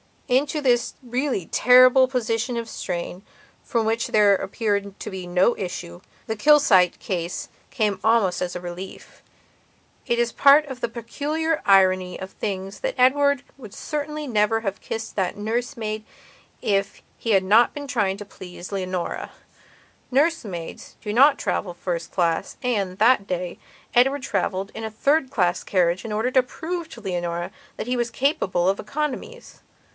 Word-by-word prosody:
Into 285 +4 +1
this 245 -3 +2
really 250 - -2
terrible 255 +1 +6
position 240 -1 -1
of 230 -1 -4
strain, 175 -1 -5 0.4
from 230 -3 0
which 225 +1 0
there 210 -2 +5
appeared 200 0 -2
to - - -6
be 185 -2 -6
no 180 +6 +3
issue, 175 - -6 0.3
the 220 - -3
Kilsyte 210 - +5
case 175 -2 -4 0.2
came 210 -5 0
almost 220 -5 +2
as 180 -1 -3
a 180 - -4
relief. 180 +2 -9 0.9
It 235 -1 +1
is 240 0 +1
part 285 +4 +6
of 265 -2 -7
the - - -1
peculiar 295 +8 -2
irony 185 -2 +4
of 190 0 -7
things 195 -2 -5
that - - -2
Edward 280 +1 +3
would 220 -7 -11
certainly 300 +2 -4
never 225 -2 +1
have 195 -2 -3
kissed 225 -1 -6
that 190 -1 -1
nurse 235 +6 -2
maid 215 -2 -4 0.6
if 195 -1 -1
he 230 - -2
had 195 -2 +4
not 220 +5 +4
been 290 -1 -6
trying 210 -8 0
to 205 - -8
please 180 -1 -10
Leonora. 185 -2 -3 0.8
Nurse 300 +3 +2
maids 175 -5 -8
do 210 - -4
not 275 +5 +6
travel 180 - -2
first 170 -1 -4
class, 170 -3 0
and, 200 -7 -1
that 220 -1 +4
day, 180 -1 -4 0.3
Edward 265 +3 +3
travelled 195 -3 -2
in 225 - -5
a - - -3
third 275 +6 +1
class 180 -9 +1
carriage 180 +1 +1
in 220 - -4
order 225 +4 0
to 260 - +5
prove 330 +6 -5
to 235 - -11
Leonora 175 -3 -3 0.2
that - - -5
he 250 0 0
was 240 0 0
capable 230 - 0
of 195 - 0
economies. 300 - -5
220 Hz, 160 wpm, -23 LUFS, 190-255 Hz, 0.9 s, terrible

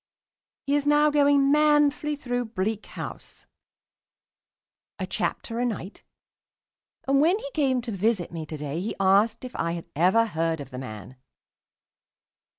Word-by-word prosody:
He 280 - 0
is 290 0 +1
now 295 +1 +4
going 285 -1 +4
manfully 295 0 +3
through 245 -3 -3
"Bleak 220 0 -3
House" - - -8 1.5
a - - -3
chapter 230 0 -3
a 245 - +1
night 205 -3 -6 1.1
and 275 +1 +4
when 345 +6 +4
he - - -7
came 265 -5 +1
to 235 - -5
visit 200 -2 0
me 160 -2 -6
to 155 - -6
day 150 +3 -4
he 215 - -3
asked 200 +5 +3
me - - -5
if 250 - -9
I 170 0 -1
had 170 -1 -6
ever 185 +9 +4
heard 165 -5 -1
of 140 -1 -9
the 125 - -6
man. 110 -1 -9
230 Hz, 155 wpm, -26 LUFS, 170-285 Hz, 1.5 s, now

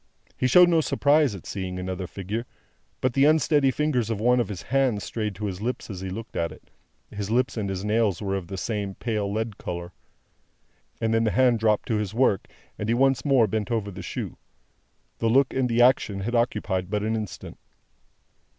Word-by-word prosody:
He 130 - +1
showed 180 +7 +7
no 165 -2 +3
surprise 145 -5 +2
at 95 - -11
seeing 95 -2 -4
another 90 0 -4
figure, 105 +7 -5 0.5
but 130 -1 +1
the 135 +3 +4
unsteady 150 -2 +4
fingers 130 -5 0
of 110 -3 -2
one 125 +3 +3
of 120 - +1
his 100 -4 -6
hands 130 -5 +1
strayed 105 -3 -3
to 105 - -5
his 95 -1 -4
lips 120 0 -3
as 95 -2 -7
he 95 - -4
looked 110 +5 -7
at 85 - -1
it - - -16 0.4
(his 100 -1 -4
lips 125 +3 +1
and 105 -4 -2
his 95 +1 -4
nails 105 -3 +1
were 100 -2 -2
of 95 -3 -4
the 95 - -6
same 100 -2 -3
pale 105 -4 -2
lead 110 0 -3
colour), 85 0 -5 1.1
and 115 0 0
then 115 0 +3
the 110 - +2
hand 125 0 +3
dropped 105 -1 +1
to 110 - +2
his 105 0 -3
work, 115 -6 +2 0.3
and 105 - -3
he 115 - +3
once 135 +1 +3
more 135 -5 +4
bent 105 0 -2
over 110 -4 -1
the - - -8
shoe. - - -5 0.8
The 115 - +1
look 135 +3 +3
and 130 -1 +1
the 120 +1 +4
action 105 -5 +3
had 115 +5 -3
occupied 95 -6 0
but 105 0 -1
an 110 +1 0
instant. 105 -4 -6
110 Hz, 205 wpm, -25 LUFS, 100-125 Hz, 1.1 s, showed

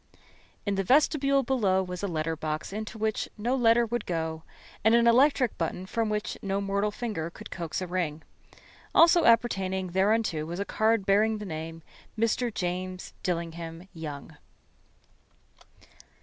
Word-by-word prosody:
In 200 - 0
the 195 0 0
vestibule 275 - +3
below 205 -7 +2
was 180 -1 -6
a 200 - -1
letter 165 -2 -2
box 155 +3 -4
into 215 +1 -5
which 220 0 -1
no 240 +5 0
letter 235 -1 +4
would 240 +1 -3
go, 160 -2 -2 0.4
and 220 +2 +5
an 235 0 +4
electric 250 0 +4
button 175 +2 -2
from 225 +3 -1
which 210 0 -3
no 195 0 -1
mortal 200 +1 0
finger 210 -7 -4
could - - -12
coax 170 -1 -4
a - - -2
ring. 170 -4 -2 0.7
Also 340 +1 +6
appertaining 190 -5 +2
thereunto 195 -3 +1
was 170 +4 -5
a 200 - -1
card 220 -1 +1
bearing 215 +3 +3
the 210 - -7
name 165 -1 -6 0.3
"Mr. 230 +2 +1
James 185 -1 -4
Dillingham 170 0 -4
Young." 155 -2 -8
195 Hz, 150 wpm, -28 LUFS, 170-225 Hz, 0.7 s, Also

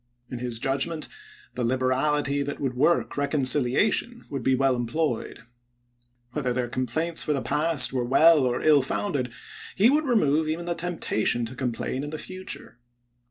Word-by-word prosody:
In 125 - -5
his 120 -2 -2
judgment, 140 +6 -1 0.5
the 125 - -3
liberality 130 +3 0
that 140 0 -4
would 135 -3 -2
work 150 +7 +1
reconciliation 145 - +1
would 135 -2 -3
be 130 +2 +2
well 135 0 +2
employed. 120 0 -3 0.9
Whether 130 -2 -2
their 125 -1 -2
complaints 155 +8 -1
for 150 - 0
the 135 - -2
past 150 -4 +2
were 125 -2 0
well 155 +6 +5
or 125 -2 0
ill 150 -2 +5
founded, 135 - -2 0.4
he 215 +6 +5
would 305 +2 +2
remove 160 - +2
even 165 +2 -3
the 175 - -1
temptation 165 -9 -1
to 125 +3 -8
complain 130 +1 -3
in 145 - -5
the 155 - -5
future. 185 -8 -7
140 Hz, 160 wpm, -25 LUFS, 125-160 Hz, 0.9 s, well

